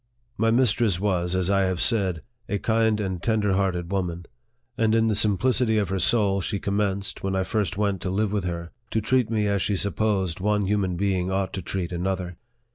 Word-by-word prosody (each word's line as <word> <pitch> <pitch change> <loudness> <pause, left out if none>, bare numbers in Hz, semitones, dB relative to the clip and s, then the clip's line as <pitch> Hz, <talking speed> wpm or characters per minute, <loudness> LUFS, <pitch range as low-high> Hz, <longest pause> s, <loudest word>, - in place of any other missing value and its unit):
My 115 +1 +1
mistress 115 -5 +2
was, 90 -3 0
as 95 +1 +1
I 100 -1 +3
have 95 -2 -1
said, 95 -8 +1 0.3
a 100 - 0
kind 110 0 +1
and 95 -4 -3
tender 105 -2 +1
hearted 95 -2 -1
woman; 90 -3 -2 0.5
and 110 -1 +2
in 115 0 +3
the - - +2
simplicity 110 +3 +2
of 100 -4 0
her 95 0 -1
soul 100 +1 +2
she 100 +3 -1
commenced, 100 0 -2
when 95 0 -2
I 95 - +1
first 105 -1 -2
went 100 -3 0
to 90 - -3
live 100 +2 0
with 100 -3 -1
her, 85 -1 -4 0.2
to 110 - 0
treat 120 +1 +1
me 110 -2 0
as 100 -2 0
she 100 - +1
supposed 100 -3 0
one 105 +1 +1
human 95 -2 0
being 95 -1 0
ought 95 0 -1
to 95 - -3
treat 90 0 -4
another. 90 0 -3
100 Hz, 200 wpm, -24 LUFS, 95-105 Hz, 0.5 s, I